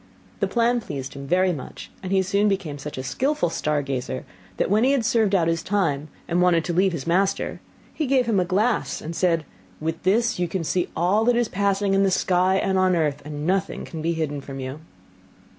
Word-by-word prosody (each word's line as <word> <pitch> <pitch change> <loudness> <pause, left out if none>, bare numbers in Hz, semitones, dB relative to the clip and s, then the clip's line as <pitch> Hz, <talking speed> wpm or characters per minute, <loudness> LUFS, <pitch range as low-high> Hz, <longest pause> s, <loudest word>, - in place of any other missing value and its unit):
The - - +1
plan 240 0 +2
pleased 135 -9 -6
him 140 0 -8 0.3
much, 130 - -9
and 185 - -5
he 190 -1 +3
soon 200 +2 +2
became 175 -8 -2
such 145 0 -7
a 130 - -3
skilful 260 - 0
star 150 -3 0
gazer, 130 -1 -4 0.3
that - - 0
when 215 +3 +4
he 270 +2 +4
had 255 -5 +1
served 215 -3 +2
out 170 -3 +3
his 165 0 0
time, 165 -8 0 0.2
and 175 +1 +1
wanted 175 -2 +3
to 175 - -2
leave 190 +2 +3
his 165 -6 -5
master, 190 +3 0 0.3
he 310 - -2
gave 260 -1 +3
him 220 -4 +2
a - - +3
glass, 205 +6 0
and 165 +2 -6
said, 165 -4 +1 0.3
'With 160 +1 -3
this 230 +3 +2
you 175 - +1
can 175 0 -3
see 175 +2 0
all 185 +6 +2
that 245 0 +4
is 240 -1 +2
passing 200 0 +1
in 195 - +3
the 195 - +4
sky 185 0 +2
and 190 0 +1
on 185 -1 +3
earth, 150 -4 0
and 150 0 -5
nothing 190 +2 -1
can 160 - -7
be 165 +2 0
hidden 150 -3 -2
from 135 0 -8
you. 130 +3 -5
180 Hz, 220 wpm, -24 LUFS, 155-200 Hz, 0.3 s, when